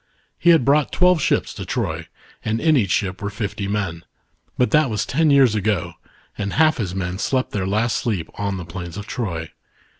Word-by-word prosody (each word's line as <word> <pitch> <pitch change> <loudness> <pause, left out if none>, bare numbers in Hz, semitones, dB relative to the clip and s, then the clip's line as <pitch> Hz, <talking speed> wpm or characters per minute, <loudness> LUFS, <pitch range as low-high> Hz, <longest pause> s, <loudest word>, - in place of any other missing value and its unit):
He 175 - +3
had 165 -7 +6
brought 145 +1 +3
twelve 180 -2 +4
ships - - +1
to - - -6
Troy, - - -3 0.4
and 110 +1 -1
in 160 +2 +3
each 105 -8 +2
ship 95 0 -1
were 100 - -2
fifty 105 -1 -4
men; 95 -5 -2 0.5
but 125 - +2
that 150 -3 +4
was 105 -2 -1
ten 160 +3 +2
years 135 -5 +5
ago, 105 -3 -1 0.4
and 100 -1 -3
half 155 0 +4
his 95 -5 -3
men 90 0 -3
slept 130 +3 0
their 95 -2 -2
last 110 +3 +1
sleep 95 -9 -2
on 100 -1 -3
the 90 - -6
plains 85 +2 -7
of 105 - -6
Troy. 85 -10 -4
105 Hz, 200 wpm, -21 LUFS, 95-135 Hz, 0.5 s, had